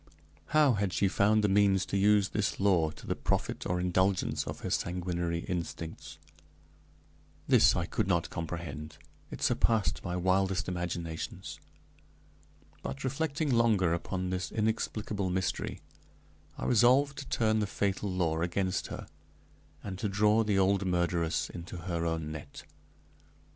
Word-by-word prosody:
how 150 -3 +4
had 100 -3 0
she 100 - +2
found 105 +3 +3
the - - +4
means 100 -1 +3
to - - -4
use 100 0 +4
this 105 - -1
law 90 -5 +3
to 75 - -12
the - - -1
profit - - -2
or 90 0 0
indulgence 95 +1 +1
of - - -6
her - - -3
sanguinary 85 -1 -1
instincts? 85 -2 -5 1.3
This - - +6
I - - 0
could - - -1
not - - 0
comprehend; 80 -2 -5 0.3
it - - -7
surpassed 110 -3 +1
my 90 -1 -3
wildest 95 +1 +1
imaginations. 85 -2 -4 1.2
But 140 - -5
reflecting 145 +2 -1
longer 110 -8 +3
upon 90 +2 -3
this 90 -1 -3
inexplicable 105 -2 -1
mystery, 95 +1 -2 0.8
I - - -4
resolved 130 +4 +4
to 140 - -8
turn 110 -1 +2
the 105 - 0
fatal 100 0 -1
law 85 -3 0
against 90 +2 -1
her, - - -7 0.8
and 95 -2 -6
to 105 - -1
draw 105 +2 +3
the 105 -2 +1
old 95 +1 +3
murderess 85 -2 0
into 85 +1 -8
her 85 -1 -2
own 80 -2 -2
net. 80 -1 -8
95 Hz, 140 wpm, -30 LUFS, 85-105 Hz, 1.3 s, This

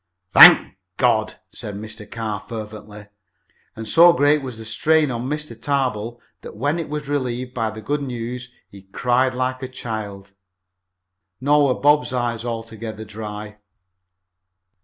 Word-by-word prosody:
"Thank - - +8 0.2
God!" - - +2 0.2
said 105 - -7
Mr. 110 0 -9
Carr 110 -3 -4
fervently, 105 -1 -9 0.7
and 110 0 -7
so 170 +9 +7
great 145 -1 +3
was 130 -4 -7
the 110 - -9
strain 155 +5 +2
on 120 +2 -4
Mr. 150 -4 -4
Tarbill 120 -2 -2 0.2
that - - -10
when 145 +8 0
it 160 - -5
was 150 -1 -5
relieved 130 -3 -3
by 115 -3 -1
the 110 0 -9
good 145 +6 -1
news 125 -1 -5 0.2
he 100 - -14
cried 125 +6 0
like 130 0 -2
a 130 - -4
child. 105 -6 -7 1.1
Nor 145 +2 +3
were - - -11
Bob's 145 -2 +3
eyes 120 -2 -2
altogether 115 -2 -6
dry. 105 -1 -8
120 Hz, 140 wpm, -21 LUFS, 110-135 Hz, 1.1 s, Thank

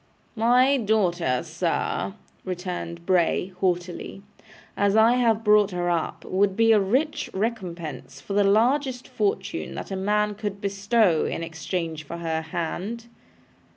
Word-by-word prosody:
'My 250 +5 +4
daughter, 180 - +1
sir,' 95 0 -2 0.3
returned 175 -2 -5
Bray, 185 0 +1
haughtily, 180 +1 -2 0.5
'as 200 0 +2
I 220 +2 +6
have 225 -3 +2
brought 210 -1 +5
her 175 -2 -1
up, 165 -2 -2
would 195 +1 +1
be 225 0 +5
a 215 - +6
rich 260 +11 0
recompense 180 - -4
for 200 - -6
the 205 0 +4
largest 250 +5 +2
fortune 410 +1 -2
that - - -7
a - - -2
man 210 +2 +1
could 205 -1 -5
bestow 200 -3 +2
in - - -3
exchange 165 -1 -4
for 170 +3 -7
her 165 -1 -2
hand. 185 +8 -4
195 Hz, 135 wpm, -25 LUFS, 175-225 Hz, 0.5 s, I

